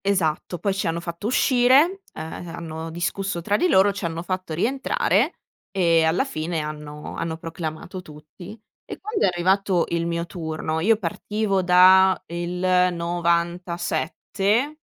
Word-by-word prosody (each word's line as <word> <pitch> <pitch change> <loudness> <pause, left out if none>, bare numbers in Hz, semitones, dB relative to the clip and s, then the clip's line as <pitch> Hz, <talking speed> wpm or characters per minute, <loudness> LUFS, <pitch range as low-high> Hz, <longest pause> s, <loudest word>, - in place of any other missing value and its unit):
Esatto, 175 -3 0
poi 195 +4 -1
ci 195 - -2
hanno 165 +1 -1
fatto 170 +4 -5
uscire, 260 - +4
uhm, 160 +2 -7
hanno 160 -1 -6
discusso 175 +3 -2
tra 200 +5 0
di 360 - +2
loro, 200 - +5
ci 195 0 -7
hanno 165 0 -3
fatto 185 -3 -4
rientrare 260 - +1 0.3
e 170 -4 +3
alla 160 +10 +2
fine 165 - -3
hanno 150 0 -7
hanno 165 -1 -3
proclamato 165 +2 -6
tutti. 175 +6 -12 0.2
E - - -9
quando 425 +1 -1
è - - +4
arrivato 185 0 +1
il 170 0 -1
mio 170 0 -2
turno 160 -2 -4
io 215 +6 +3
partivo 205 +1 -1
da 185 +1 +6
il 175 +2 -3 0.2
97 175 - -1
175 Hz, 140 wpm, -23 LUFS, 165-195 Hz, 0.3 s, da